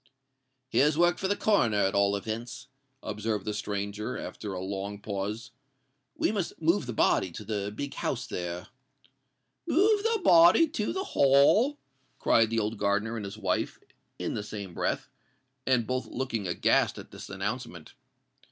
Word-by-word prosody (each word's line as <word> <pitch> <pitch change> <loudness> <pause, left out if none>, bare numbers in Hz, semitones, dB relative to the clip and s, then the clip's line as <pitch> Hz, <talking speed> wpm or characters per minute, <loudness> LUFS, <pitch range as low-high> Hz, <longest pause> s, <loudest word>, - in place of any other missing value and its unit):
"Here's 145 +3 +3
work 175 +1 +3
for 190 - -1
the 205 - +1
Coroner, 160 - +2
at 95 -1 +2
all 100 0 +3
events," 115 +5 -5 0.3
observed 105 0 -3
the 105 - -2
stranger, 105 +3 -3
after 105 - -6
a 95 - -4
long 100 +2 -4
pause. 105 +3 -4 0.6
"We - - +1
must 200 -5 -3
move 165 -2 +2
the 120 - -3
body 95 -3 +2
to 105 - -7
the 100 -1 -3
big 140 +6 -5
house - - -2
there——" 90 0 -5 1.0
"Move 410 +5 +4
the 455 +1 +1
body 175 - +7
to 215 -9 -2
the 380 - -2
Hall!" 200 - +4 0.4
cried 115 -1 +3
the 115 - -1
old 110 0 -1
gardener 105 +3 0
and 110 -3 -4
his 100 +2 -7
wife, 95 -4 -1 0.4
in - - -3
the - - -2
same 100 -3 -7
breath, - - -2 0.6
and 125 -3 +3
both 130 +3 -2
looking 120 -6 -3
aghast 85 - +2
at - - -10
this - - -10
announcement. - - -5
110 Hz, 160 wpm, -28 LUFS, 100-150 Hz, 1.0 s, body